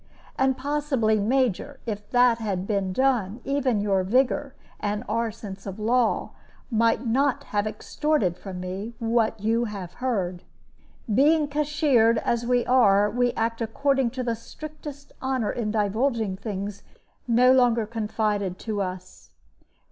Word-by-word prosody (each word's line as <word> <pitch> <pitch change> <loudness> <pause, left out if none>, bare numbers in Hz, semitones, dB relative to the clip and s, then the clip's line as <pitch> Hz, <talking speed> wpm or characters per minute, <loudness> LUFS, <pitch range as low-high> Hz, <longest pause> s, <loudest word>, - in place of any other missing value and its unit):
And 265 0 +2
possibly, 270 -6 +1
Major, 260 +4 0
if 210 -2 -5
that 245 -2 +4
had 195 -4 -2
been 195 -3 -1
done, 240 -2 +1
even 265 -6 0
your 195 -2 +1
vigor 265 +6 +1 0.2
and 210 +1 -2
our 230 +2 0
sense 200 -3 -9
of 195 0 -6
law 230 +2 +1 0.4
might 230 +2 +2
not 265 +3 +1
have 205 0 -1
extorted 215 - 0
from 185 0 -8
me 190 +6 -5
what 225 -1 +1
you 230 +3 +1
have 195 -5 -6
heard. 190 -9 -1 0.7
Being 295 +5 +4
cashiered, 285 -6 +2
as 235 +1 -1
we 245 -1 +2
are, 210 -5 +4
we 245 +2 +1
act 230 +1 -1
according 270 +3 +1
to 255 - -1
the 235 -1 0
strictest 295 +3 -10
honor 260 -5 0
in 230 -3 -2
divulging 220 0 0
things 200 0 -5 0.5
no 250 +2 +5
longer 240 -3 +3
confided 210 -3 -2
to 215 -3 -3
us." 185 -1 -7
230 Hz, 140 wpm, -25 LUFS, 205-260 Hz, 0.7 s, no